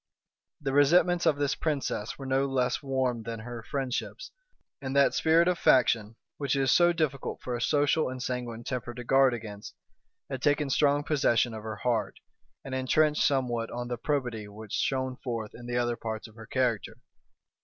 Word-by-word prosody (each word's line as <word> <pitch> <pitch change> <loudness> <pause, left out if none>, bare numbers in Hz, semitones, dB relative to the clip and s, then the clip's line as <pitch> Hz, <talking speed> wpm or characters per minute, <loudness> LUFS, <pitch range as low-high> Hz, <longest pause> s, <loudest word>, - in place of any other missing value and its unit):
The 135 -2 -3
resentments 175 +5 +4
of 145 - +3
this 145 -1 +1
princess 135 -7 -2
were 135 - -8
no 135 +1 +1
less 130 -2 0
warm 130 -3 -1
than 115 0 -6
her 120 +1 -7
friendships; 135 - -4 0.5
and 135 0 -4
that 140 0 +5
spirit 165 +2 +4
of 180 -1 +1
faction, 115 -4 +3 0.2
which 140 -2 0
it 135 - +1
is 130 - +3
so 175 +5 +5
difficult 155 -5 -2
for 125 - -3
a 120 - -4
social 145 +2 +2
and 130 0 -6
sanguine 125 -2 -4
temper 120 -1 -4
to 125 - -6
guard 135 0 +4
against, 105 -3 -9 0.5
had 135 -2 -5
taken 145 -1 +1
strong 145 +1 +3
possession 125 -6 +2
of 110 - -6
her 110 0 -5
heart, 115 +1 -1 0.5
and 135 - -6
intrenched 150 +4 +2
somewhat 120 -4 +1
on 120 0 -5
the 120 - -2
probity 120 -7 -2
which 105 0 -11
shone 130 0 -1
forth 115 -4 -5
in 120 0 -10
the 120 0 -1
other 120 -1 +1
parts 110 -1 -5
of 110 - -17
her 110 0 -12
character. 125 -5 -1
130 Hz, 185 wpm, -28 LUFS, 115-140 Hz, 0.5 s, that